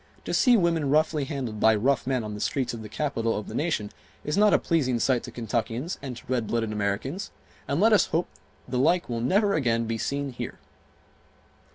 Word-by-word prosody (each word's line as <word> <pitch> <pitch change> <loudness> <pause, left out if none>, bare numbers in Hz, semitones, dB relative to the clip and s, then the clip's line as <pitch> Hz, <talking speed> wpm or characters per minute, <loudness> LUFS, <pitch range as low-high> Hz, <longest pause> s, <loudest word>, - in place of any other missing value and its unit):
To - - -3
see 250 -3 +5
women 165 -6 +1
roughly 155 0 +2
handled 130 -7 -4
by 110 +1 +5
rough 130 +5 +1
men 130 -3 0
on 105 -1 -5
the 105 - -6
streets 130 +3 -1
of 115 - -6
the 105 - -8
capital 115 -2 -1
of 105 - -5
the - - -7
nation 145 -10 -1 0.3
is 150 - -1
not 210 +1 +5
a - - +6
pleasing 135 -8 +1
sight 125 0 +2
to - - -8
Kentuckians 120 - -3
and 130 -4 -6
to - - -13
red 120 -3 -1
blooded 115 -2 -1
Americans, 105 - -2 0.4
and 140 +3 0
let 220 +3 +5
us 210 - +5
hope 165 +2 0 0.4
the 125 0 -1
like 170 +5 +2
will 115 -1 -2
never 200 - +2
again 115 -7 +1
be 115 0 -3
seen 140 +2 -2
here." - - -6
130 Hz, 210 wpm, -26 LUFS, 115-160 Hz, 0.4 s, a